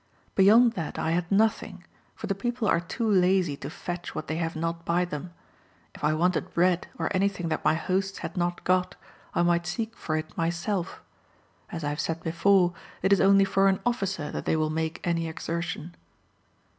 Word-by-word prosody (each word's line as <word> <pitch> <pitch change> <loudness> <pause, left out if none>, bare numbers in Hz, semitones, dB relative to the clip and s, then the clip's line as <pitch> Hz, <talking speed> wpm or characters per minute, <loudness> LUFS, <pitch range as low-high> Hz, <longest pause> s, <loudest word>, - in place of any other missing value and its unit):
Beyond 225 +5 +6
that 165 -4 -4
I 160 - 0
had 175 +2 -1
nothing, 220 +3 +1 0.3
for - - -6
the 195 - 0
people 240 +3 -2
are - - +3
too 200 +7 -3
lazy 185 -5 +3
to 140 - -6
fetch 175 +2 -6
what 155 - -3
they 155 - -2
have 165 0 -2
not 165 +1 -3
by 175 +2 +1
them. 170 +1 -6 0.6
If - - -13
I 155 +1 +3
wanted 180 +2 0
bread, 180 0 +2
or 165 - -2
anything 195 -3 0
that 155 - -2
my - - +3
hosts 190 +4 -1
had - - -6
not 175 -1 -1
got, 185 0 +1 0.4
I - - +3
might 175 0 +2
seek 225 +4 -3
for 155 -7 -2
it 155 +1 -6
myself. 175 +3 -2 0.7
As 165 -2 -5
I 145 - 0
have 150 - -4
said 165 0 -2
before, 175 +2 +3 0.3
it 190 +1 +5
is 200 - +3
only 195 0 +6
for 195 0 +3
an 190 -1 +2
officer 195 -10 -1
that - - -5
they - - +2
will 155 -1 0
make 160 0 -2
any 165 -1 0
exertion. 170 0 -4
175 Hz, 195 wpm, -27 LUFS, 165-195 Hz, 0.7 s, Beyond